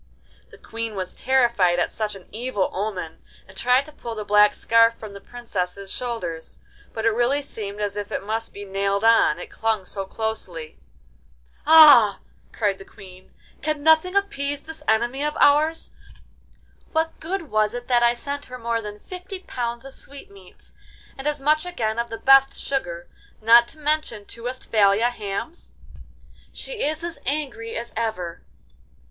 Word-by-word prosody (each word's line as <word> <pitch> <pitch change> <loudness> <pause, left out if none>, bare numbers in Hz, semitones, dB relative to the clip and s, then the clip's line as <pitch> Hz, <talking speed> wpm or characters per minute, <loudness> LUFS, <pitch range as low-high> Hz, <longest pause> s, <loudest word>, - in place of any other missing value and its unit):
The - - -15
Queen 230 -1 -6
was 185 -1 -4
terrified 235 -9 +2
at 175 - 0
such 215 -2 -3
an 190 - -13
evil 220 -3 -2
omen, 185 -5 -4 0.3
and 190 - -16
tried 250 +6 +3
to 305 - -11
pull 235 -6 -7
the 210 -1 -5
black 210 0 +5
scarf 230 0 +4
from 215 -3 -10
the 200 - -10
Princess's 200 -5 -5
shoulders, 180 -10 -5 0.3
but 220 0 -4
it 230 - +5
really 245 +6 +1
seemed 210 -6 -5
as 205 -1 -2
if 205 -1 -5
it - - -3
must 225 +2 -3
be 205 0 -9
nailed 200 +1 -1
on, 225 -9 +5
it 175 - -9
clung 220 -4 -1
so 195 +1 -5
closely. 190 - -5 0.9
'Ah!' 295 -10 +8 0.3
cried 200 -3 -1
the - - -9
Queen, 185 -1 -15 0.3
'can 305 -1 -2
nothing 320 +4 +4
appease 290 -9 -1
this 320 0 -9
enemy 240 +5 +1
of 300 +1 -2
ours? 310 +3 +3 1.0
What 320 +1 -1
good 335 -1 -4
was 215 +1 +1
it 245 0 -6
that 245 -2 +3
I 240 0 +4
sent 285 +3 -4
her 255 - -8
more 230 -1 -2
than 210 -1 -7
fifty 365 - -9
pounds 240 -6 -4
of 270 - -8
sweetmeats, 200 -12 -12 0.4
and 270 +2 -5
as 300 -1 0
much 305 +3 +2
again 235 -11 -2
of 235 0 -2
the 225 - -5
best 270 +1 +5
sugar, 175 -11 -3 0.3
not 235 +2 +6
to - - -13
mention 300 -8 -1
two 230 +2 -11
Westphalia 225 -2 +2
hams? 215 - -6 0.8
She - - -5
is 310 +3 0
as 340 -1 -4
angry 265 -6 -3
as 235 +1 -5
ever. 215 -7 -3
230 Hz, 165 wpm, -23 LUFS, 205-280 Hz, 1.0 s, Ah